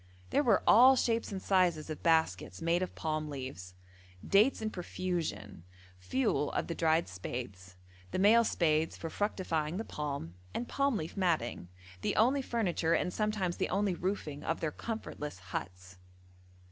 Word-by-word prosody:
There - - +3
were 245 - +3
all 255 +5 +8
shapes 230 -3 0
and 195 - -3
sizes 175 -5 +1
of 155 - -6
baskets 160 -1 +1
made 170 +2 +1
of 185 - -3
palm 155 -1 -2
leaves, 130 -10 -7 0.5
dates 215 +7 +4
in 220 -1 -3
profusion, 165 - -4 0.4
fuel 130 +9 0
of - - 0
the 170 - -3
dried 165 0 +2
spathes, 95 -1 -7 0.3
the - - -3
male 215 +5 +6
spathes 160 -6 +1
for 165 - -6
fructifying 175 -6 -1
the 225 - -3
palm, 140 - -4 0.2
and 240 - -2
palm 275 -4 +1
leaf 160 -2 -5
matting 160 - 0 0.3
the - - -1
only 260 +6 +4
furniture, 180 -10 0
and 180 - -1
sometimes 210 -5 -1
the - - -1
only 195 0 +1
roofing 170 -5 -3
of 165 - -1
their 155 - -1
comfortless 150 - -5 0.2
huts. 90 0 -6
165 Hz, 155 wpm, -32 LUFS, 145-205 Hz, 0.5 s, all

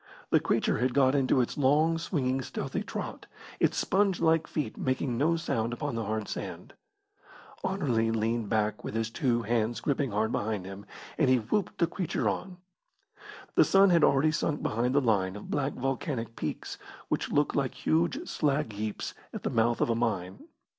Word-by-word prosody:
The - - +6
creature - - +1
had 125 +1 0
got 135 -2 +4
into 135 -2 +3
its 125 - -3
long, 155 +4 +3
swinging, 135 -6 -1
stealthy - - -4
trot, - - -6 0.3
its - - +2
sponge 195 -2 +2
like 160 -1 +3
feet 150 - -3
making 130 -1 -1
no 155 +7 +2
sound 120 -7 -1
upon 145 +2 -3
the 115 -1 -2
hard 110 0 -2
sand. - - -6 0.9
Anerley 135 -13 +1
leaned 115 -1 0
back 110 -1 0
with - - -5
his 115 0 -1
two 120 -2 +1
hands 115 +1 0
gripping 140 -2 0
hard 110 +2 0
behind 105 -4 -2
him, 95 +1 -9 0.3
and - - +4
he 130 - +5
whooped 130 - -1
the 170 - +3
creature 175 0 -2
on. 185 -1 -3 1.0
The - - +6
sun 195 0 +5
had 170 -3 +5
already 140 +3 +4
sunk 150 -1 -1
behind 120 +4 0
the 145 - +5
line 100 -6 +1
of 105 - -8
black 145 -1 0
volcanic 130 -3 -3
peaks, - - -5 0.3
which - - -1
look 145 0 +2
like 135 -3 -1
huge 170 - 0
slag 145 -5 0
heaps 105 +1 -4 0.2
at - - -7
the - - -1
mouth 115 +1 +2
of - - +2
a - - +3
mine. 100 -6 -1
130 Hz, 180 wpm, -29 LUFS, 115-150 Hz, 1.0 s, The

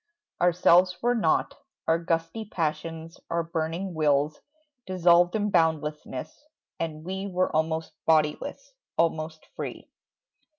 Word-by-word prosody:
Ourselves 180 +1 +5
were 240 +1 +3
nought, 225 - +1 0.3
Our 165 +1 +3
gusty 165 +5 -1
passions, 165 -2 -3
our 170 0 0
burning 165 +3 -3
wills 150 -1 +1 0.5
Dissolved 175 -1 +4
in 210 -1 0
boundlessness, 155 - -1 0.4
and 155 -2 -4
we 190 +2 -3
Were 185 -3 0
almost 160 +1 0
bodiless, 160 - +1 0.2
almost 160 -1 0
free. - - -6
165 Hz, 110 wpm, -27 LUFS, 155-180 Hz, 0.5 s, Ourselves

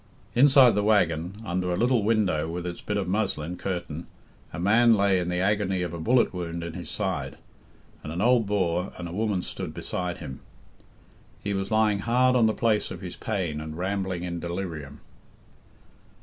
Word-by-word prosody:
Inside 135 -1 +7
the 105 - +1
waggon, 95 -3 +1
under 90 0 -1
a - - +1
little 120 0 +2
window 100 -8 +1
with 85 +1 -4
its 85 -1 -5
bit 105 - -2
of 100 - -1
muslin 90 -4 -1
curtain, 85 -4 -4 0.4
a 80 - -6
man 110 +5 +5
lay 100 -2 +3
in 90 0 -2
the 90 - -1
agony 95 -1 +1
of 85 -1 -4
a 85 - -5
bullet 120 +7 +3
wound 85 -2 -4
in 85 -1 -5
his - - -6
side, - - -3 0.6
and 75 - -7
an 85 - -4
old 120 0 +3
Boer 90 -2 0
and 85 - -5
a - - -7
woman 105 -2 0
stood - - -5
beside 90 -1 -3
him. 65 - -8 1.0
He 100 - -1
was 95 0 -2
lying 110 -2 +2
hard 125 +4 +3
on 115 -3 +5
the 110 - +1
place 110 -3 +1
of - - -7
his 90 -2 -6
pain 90 -8 -3
and 80 0 -7
rambling 95 -1 -2
in 85 -1 -3
delirium. 85 -5 -5
95 Hz, 185 wpm, -26 LUFS, 85-105 Hz, 1.0 s, Inside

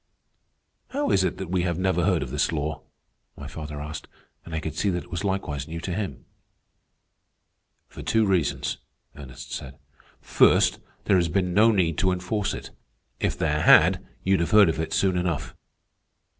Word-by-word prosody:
"How 285 +2 -1
is 95 - +3
it 95 - -1
that 95 -2 -6
we 95 -1 +1
have 85 -2 -1
never 95 -2 +1
heard - - +2
of - - -7
this 75 +3 0
law?" 80 0 -3 0.6
my - - -8
father 75 -2 -7
asked, 75 0 -7 0.4
and 80 - -7
I - - -1
could 80 0 -5
see 100 - 0
that 90 -2 -2
it - - -19
was 85 - -3
likewise 95 -8 -2
new 85 +1 -6
to 90 +1 -4
him. 95 - -5 1.6
"For - - -11
two 110 -1 +2
reasons," 95 -6 0 0.4
Ernest 70 -3 -10
said. 65 +1 -7 0.4
"First, - - +3 0.2
there 100 - +3
has 85 -2 +2
been 90 0 0
no 110 +4 +5
need 85 -7 +1
to 95 - +2
enforce 100 +3 -2
it. - - -9 0.5
If - - -1
there 75 -1 0
had, - - +6 0.2
you'd 95 0 +2
have 85 -1 0
heard 105 -3 +6
of 80 - -2
it 80 - -3
soon 95 -2 +1
enough. 90 -4 -2
90 Hz, 180 wpm, -25 LUFS, 80-95 Hz, 1.6 s, had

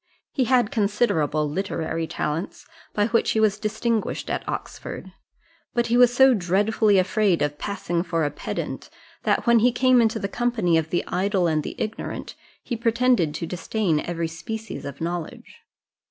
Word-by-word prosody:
He 260 - +1
had 245 -3 +3
considerable 200 - +1
literary 165 -1 -2
talents, 160 +4 -4 0.3
by 205 - +1
which 230 0 +2
he 220 - +1
was 215 -1 +2
distinguished 220 +1 -1
at - - -2
Oxford; - - -6 0.6
but 240 -1 +2
he - - +5
was 245 0 +6
so 265 +1 +6
dreadfully 205 +2 +2
afraid 185 -2 +2
of 145 0 -2
passing 185 -4 -2
for 170 -3 -1
a 145 - -1
pedant, 145 - -5 0.4
that - - +1
when 235 -1 +5
he 245 +3 +4
came 255 0 +4
into 225 -1 +2
the 200 - -2
company 220 -6 0
of 160 -1 +1
the 175 - -1
idle 190 0 0
and 155 -2 +1
the - - -6
ignorant, 215 +1 -4 0.3
he 240 - -3
pretended 230 -8 +2
to 165 - -3
disdain 180 -1 -1
every 170 +1 -2
species 220 +7 -6
of 140 +1 -7
knowledge. 170 -1 -5
200 Hz, 165 wpm, -24 LUFS, 165-230 Hz, 0.6 s, was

